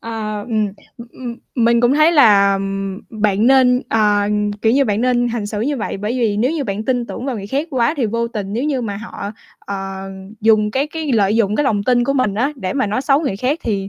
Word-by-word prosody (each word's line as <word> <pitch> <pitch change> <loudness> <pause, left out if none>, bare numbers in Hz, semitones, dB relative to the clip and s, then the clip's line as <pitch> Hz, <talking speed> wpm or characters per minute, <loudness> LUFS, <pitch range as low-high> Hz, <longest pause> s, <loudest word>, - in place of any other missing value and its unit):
Ờ, 215 -2 -4
ừm. 215 -2 +1 0.3
Ừm, 235 - -10
ừm, 240 -2 -7 0.2
mình 235 -1 +3
cũng 245 +3 +3
thấy 310 +3 +4
là, 205 -9 +5
ừm, 195 0 -3 0.2
bạn 210 +1 +2
nên, 255 -1 +4
ờ, 210 -2 +2
ừm, 210 0 0
kiểu 220 +2 0
như, 275 +2 +3
bạn 210 -1 0
nên 245 -1 +2
hành 230 -3 -3
xử 210 0 -4
như 275 +5 -1
vậy, 220 - -3
bởi 210 +4 -3
vì 215 -3 +1
nếu 240 +6 +1
như 310 -4 -2
bạn 205 0 -3
tin 245 -2 0
tưởng 250 - -6
vào 260 - -2
người 200 -2 -6
khác 280 +9 -2
quá 255 +2 +1
thì 250 -6 0
vô 230 +2 -1
tình 200 -3 -5
nếu 240 +5 -1
như 285 -4 0
mà 205 -3 -4
họ, 200 -1 -7 0.3
ờ, 195 -1 -6 0.3
dùng 215 -1 +3
cái 270 +5 0
cái 305 -3 -4
lợi 210 -1 +2
dụng 210 -2 +1
cái 295 - +1
lòng 210 -6 +1
tin 245 +2 +2
của 275 - 0
mình 255 -7 0
á, 255 +7 0
để 185 -7 -3
mà 265 -4 0
nói 210 +5 -1
xấu 275 +1 +3
người 270 -11 -2
khác 255 +9 -1
thì, 195 -3 -2
225 Hz, 250 wpm, -18 LUFS, 205-255 Hz, 0.3 s, là